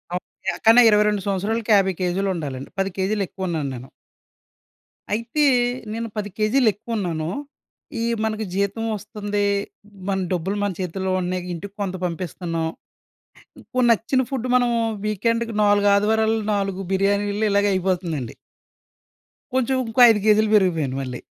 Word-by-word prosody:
Up 180 - -3 0.3
ఎక్కన్నా 225 +5 +6
22 210 -1 +3
సంవత్సరాలకి 210 +4 -1
50 190 -1 +3
కేజీలు 185 +2 0
ఉండాలండి 140 -5 -5
10 195 0 +1
కేజీలు 195 +2 0
ఎక్కువ 190 +1 -5
ఉన్నాను 155 -5 -2
నేను. 125 +2 -10 1.2
అయితే 235 +7 0 0.5
నేను 230 +1 -3
10 205 -1 -2
కేజీలు 225 +4 +2
ఎక్కువ 230 +3 -6
ఉన్నాను. 165 -5 -2 0.7
ఈ - - 0 0.2
మనకు 220 0 -1
జీతం 200 +3 -1
వస్తుంది. 205 -1 -3 0.6
మన 195 -1 0
డబ్బులు 180 +3 -2
మన 205 - 0
చేతుల్లో 190 +1 -2
ఉన్నాయి. 180 0 -2
ఇంటికి 195 +4 -7
కొంత 190 -2 -2
పంపిస్తున్నాం. 170 -1 -3 1.0
ఇప్పుడు 255 -1 0
నచ్చిన 230 +4 +2
ఫుడ్ 255 -3 -3
మనం 245 -1 +3 0.4
వీకెండ్‌కి 230 +2 -1
4 205 0 +4
ఆదివారాలు 220 +2 +2
4 195 -2 -1
బిర్యానీలు 200 +2 +1
ఇలాగే 200 0 +3
అయిపోతుందండి. 175 -9 -2 1.2
కొంచెం 260 0 +1
ఇంకో 225 +3 +1
5 220 -2 +4
కేజీలు 215 0 +4
పెరిగిపోయాను 165 -9 +2
మళ్ళీ. 125 -2 -5
200 Hz, 130 wpm, -22 LUFS, 185-220 Hz, 1.2 s, ఎక్కన్నా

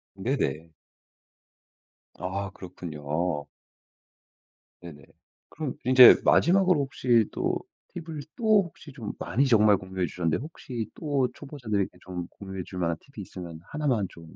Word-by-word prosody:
네네. 80 +4 -2 1.5
아 95 +2 -3
그렇군요. 80 -3 -4 1.4
네네. 75 -5 -11 0.5
그럼 150 -4 -5
인제 130 0 +9
마지막으로 180 -2 +4
혹시 125 -4 +2
또 - - -1 0.4
팁을 165 -3 -6 0.2
또 215 -3 +4
혹시 160 -4 -12
좀 115 -7 -6
많이 135 +5 +1
정말 105 -4 +5
공유해주셨는데 90 -3 -2
혹시 125 -6 -6
또 140 -5 0
초보자들에게 120 -9 -3
좀 90 -2 -6
공유해줄 95 -2 -7
만한 85 -1 0
팁이 115 -8 -10
있으면 85 -4 -9
1 150 +9 -4
만 110 -8 +2
좀 80 -1 -14
105 Hz, 255 characters per minute, -27 LUFS, 90-140 Hz, 1.5 s, 인제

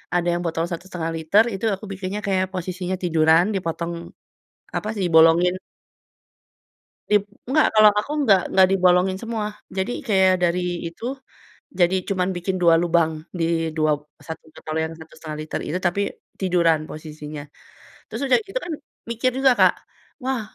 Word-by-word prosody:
ada 175 0 +1
yang 175 - -1
botol 165 0 -1
1.5 170 -1 -4
liter, 165 +7 +4
itu 195 - -6
aku 200 - -11
bikinnya 195 +1 -4
kayak 190 -1 +2
posisinya 185 0 -3
tiduran, 165 0 +4
dipotong 170 -2 -3 0.8
apa 210 - -2
sih, 205 - -5
dibolongin 165 +2 +5 1.6
Dib 210 -1 +4 0.3
nggak, 305 +3 +4
kalau 215 0 +8
aku 245 - -5
nggak 200 -7 +5
nggak 190 -1 +6
dibolongin 185 0 +3
semua. 225 -2 -3 0.3
Jadi 190 +5 -1 0.2
kayak 190 -3 +4
dari 175 +1 +2 0.3
itu 165 +6 -12 0.8
jadi 175 +1 +4
cuman 185 -2 0
bikin 185 +2 -2
2 170 -1 +6
lubang 170 -2 +2 0.3
di 165 - +1 0.3
dua 155 0 +2 0.4
1 160 -1 -7
botol 155 0 -7
yang 160 - -5
1.5 160 -1 -9
liter 155 - -4
itu, 175 - -1
tapi 175 +3 0 0.4
tiduran 170 -4 +2
posisinya. 155 -1 -8 0.7
Terus - - -5
udah 265 - +4
gitu 390 - -4
kan 345 - -4 0.4
mikir 235 +2 0
juga, 265 0 +5
Kak, - - +6 0.5
wah 260 -1 -1
180 Hz, 150 wpm, -22 LUFS, 165-195 Hz, 1.6 s, kalau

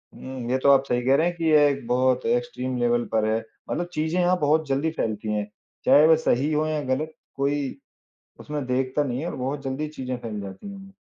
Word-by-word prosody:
हुँ, 130 -2 -7
ये 130 - +3
तो 140 - +5
आप 135 -1 +5
सही 125 0 +1
कह 130 +2 +3
रहे 160 +4 +3
हैं 175 - -2
कि 165 - -6
ये 150 -1 +6
एक 140 -4 -2
बहुत 130 0 +2
एक्सट्रीम 235 - -1
लेवल 120 0 +2
पर 110 -1 +2
है। 110 +1 +1 0.3
मतलब 175 0 -2
चीज़ें 160 +3 -1
यहाँ 180 +1 +3
बहुत 155 +1 +2
जल्दी 140 +4 0
फैलती 110 -6 -2
हैं। 105 -1 -2 0.4
चाहे 145 +4 +7
वह 160 - +7
सही 140 +5 +2
हों 155 +1 +1
या 155 -1 -1
ग़लत 155 +3 -3 0.2
कोई 140 0 -1 0.6
उसमें 150 -3 -4
देखता 130 +3 0
नहीं 125 -2 -3
है 170 - -3
और - - -6
बहुत 135 +3 -3
जल्दी 135 +3 -3
चीज़ें 130 -1 -3
फैल 110 -3 -6
जाती 100 - -8
हैं। 195 0 -12
135 Hz, 220 wpm, -24 LUFS, 125-155 Hz, 0.6 s, चाहे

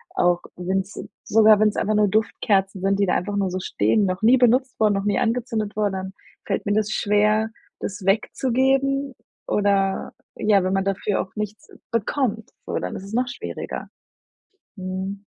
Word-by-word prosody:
Auch 175 0 +2
wenn's 190 +2 -3 0.2
sogar 215 -1 +5
wenn's 215 -1 +3
einfach 215 +1 0
nur 210 -1 +4
Duftkerzen 195 -2 0
sind, 195 +1 +1
die 200 - +2
da - - +2
einfach 205 +3 -2
nur 195 -2 +1
so 185 +1 -3
stehen, 205 +2 +1
noch 185 +1 -2
nie 240 +4 +6
benutzt 250 +1 +2
wurden, 215 -1 +4
noch 195 0 -2
nie 205 - +1
angezündet 225 -3 -1
wurden, 205 -2 0
dann 190 0 -5 0.3
fällt - - -2
mir 205 - +2
das 215 0 +1
schwer, 215 +2 +2 0.3
das 200 -1 -5
wegzugeben 265 +6 +1 0.3
oder 200 -1 +1 0.2
ja, 205 -3 +3
wenn 185 +1 0
man 195 0 +1
dafür 195 +1 0
auch 190 - -10
nichts 210 0 -5 0.2
bekommt 230 0 -1 0.2
so, - - -2
dann - - -4
ist - - -7
es 200 +2 -10
noch 250 +1 +1
schwieriger. 245 - -6 0.9
Mhm. 190 +2 -5
205 Hz, 170 wpm, -23 LUFS, 195-220 Hz, 0.9 s, nie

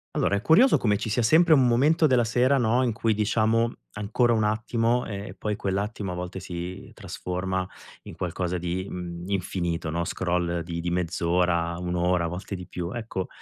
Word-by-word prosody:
Allora, 100 - +2
è - - -4
curioso 220 - +5
come 105 -3 +1
ci 110 - -4
sia 120 +3 +1
sempre 160 +8 +5
un 130 -4 +5
momento 150 +7 +4
della 125 -3 +3
sera, 125 +4 +2
no, 120 +1 +2
in 120 -3 0
cui 115 0 +1
diciamo: 110 +2 +1 0.2
"Ancora 105 +4 +1
un 110 -2 +2
attimo" 115 +3 0
e 100 -2 -5
e - - -8
poi 105 -1 -2
quell'attimo 100 0 -2
a - - -5
volte 90 +1 -5
si 90 0 -7
trasforma 95 +1 -3 0.4
in - - -10
qualcosa 90 0 -2
di, 90 +2 -3
mhmm, 85 -1 -6
infinito, 90 -3 -2
no, 85 +2 -1
scroll 85 -1 -1
di 85 -1 -5
di 85 +1 -2
mezz'ora, 85 -1 0
1 90 0 -3
ora, 90 0 +1
a - - 0
volte 90 +4 -5
di 90 -1 -7
più. 90 +1 -5
Ecco, 110 -5 -4
95 Hz, 190 wpm, -26 LUFS, 90-115 Hz, 0.4 s, curioso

